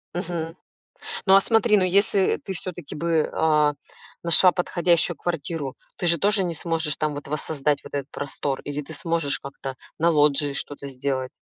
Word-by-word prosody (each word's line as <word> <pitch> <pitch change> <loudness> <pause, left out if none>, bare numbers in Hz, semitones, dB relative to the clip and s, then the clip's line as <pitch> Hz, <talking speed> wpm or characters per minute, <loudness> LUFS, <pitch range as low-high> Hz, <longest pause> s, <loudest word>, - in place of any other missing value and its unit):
Мгм. 170 -2 -4 0.7
Ну, 195 -1 +6
а 195 - +7
смотри, 220 -1 +3
ну, 190 - +2
если 195 +1 +2
ты 190 - -5
всё-таки 180 -4 -5
бы, 165 0 0
а, 150 -2 +3 0.5
нашла 170 +2 +6
подходящую 175 -2 +1
квартиру, 160 -4 -4 0.2
ты 175 - -1
же 170 0 +5
тоже 200 +2 +3
не 170 -2 -2
сможешь 160 -2 0
там 155 -1 -1
вот 145 - -7
воссоздать 150 -1 -1
вот - - -12
этот 140 -1 -3
простор, 140 -1 -3
или 145 +1 -5
ты - - -9
сможешь 165 -6 +1
как-то 135 -1 -7 0.2
на 170 +2 +3
лоджии 145 -2 +3
что-то 140 0 -4
сделать? 130 -1 -2
160 Hz, 170 wpm, -24 LUFS, 145-175 Hz, 0.7 s, а